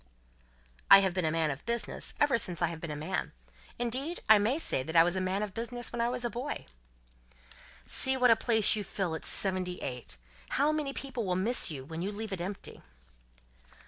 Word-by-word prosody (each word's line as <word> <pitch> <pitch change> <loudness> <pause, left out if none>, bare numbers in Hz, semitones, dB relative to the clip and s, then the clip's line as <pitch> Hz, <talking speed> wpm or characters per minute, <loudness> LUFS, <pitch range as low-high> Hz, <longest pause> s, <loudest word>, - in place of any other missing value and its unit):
"I 195 - +10
have 190 -2 0
been 185 -2 -1
a 155 - +1
man 160 -2 0
of 140 - -7
business, 235 0 -3
ever 280 -5 +3
since 180 -5 -3
I 170 - +1
have 165 -1 -8
been 170 - -6
a 150 - -4
man. 150 +1 -4 0.4
Indeed, 260 +8 -1
I 220 -1 +7
may 225 +8 +1
say 320 - 0
that 160 +5 -7
I 165 - +8
was 175 +2 0
a 185 - -1
man 190 +2 -1
of 205 -2 -5
business 235 +2 -3
when 235 - -2
a 240 0 -1
boy." 255 +6 -5 1.2
"See 265 0 +5
what 250 -2 +5
a - - +7
place 220 -3 +3
you 210 - -3
fill 185 -3 -3
at 160 - -6
seventy 185 -2 +1
eight. 125 - -6 0.4
How 285 +3 +3
many 305 -3 -2
people 265 -3 -5
will 185 -3 -1
miss 215 +6 +3
you 135 -4 -6
when 160 +3 -6
you 195 +3 -2
leave 210 0 -5
it 180 - -4
empty!" 195 +3 -6
205 Hz, 210 wpm, -30 LUFS, 170-240 Hz, 1.2 s, I